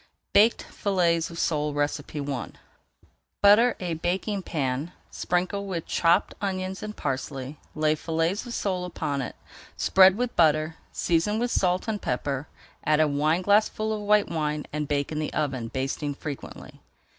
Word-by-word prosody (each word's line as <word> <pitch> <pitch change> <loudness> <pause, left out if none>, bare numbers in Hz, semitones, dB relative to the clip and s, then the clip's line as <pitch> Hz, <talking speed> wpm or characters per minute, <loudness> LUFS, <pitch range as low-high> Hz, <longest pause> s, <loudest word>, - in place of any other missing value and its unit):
BAKED 220 +3 +5
FILLETS 170 -5 0
OF 170 - -9
SOLE 150 -3 0
I 145 -2 -2 0.9
Butter 215 +4 +6
a 180 -2 -2
baking 190 +5 -1
pan, 145 0 -2 0.2
sprinkle 185 +3 -1
with 175 -4 -3
chopped 170 0 +2
onions 190 -1 -3
and 215 0 -6
parsley, 135 0 -4 0.2
lay 155 0 +2
fillets 165 +5 -1
of 240 - -6
sole 185 -3 -1
upon 145 -5 -2
it, - - -5 0.4
spread 190 0 +6
with 245 0 -2
butter, 155 -1 +3
season 175 +5 +1
with 240 +1 0
salt 180 +1 +1
and 215 -2 -2
pepper, 140 0 -2 0.4
add 155 0 +3
a 155 - +5
wineglassful 185 +9 +2
of 215 - -3
white 210 0 +3
wine, 150 -2 -2
and 150 -1 -2
bake 145 0 -1
in 155 - -2
the 155 - -2
oven, 135 -6 -1
basting 135 +3 -3
frequently. 145 -1 -8
165 Hz, 145 wpm, -26 LUFS, 150-195 Hz, 0.9 s, Butter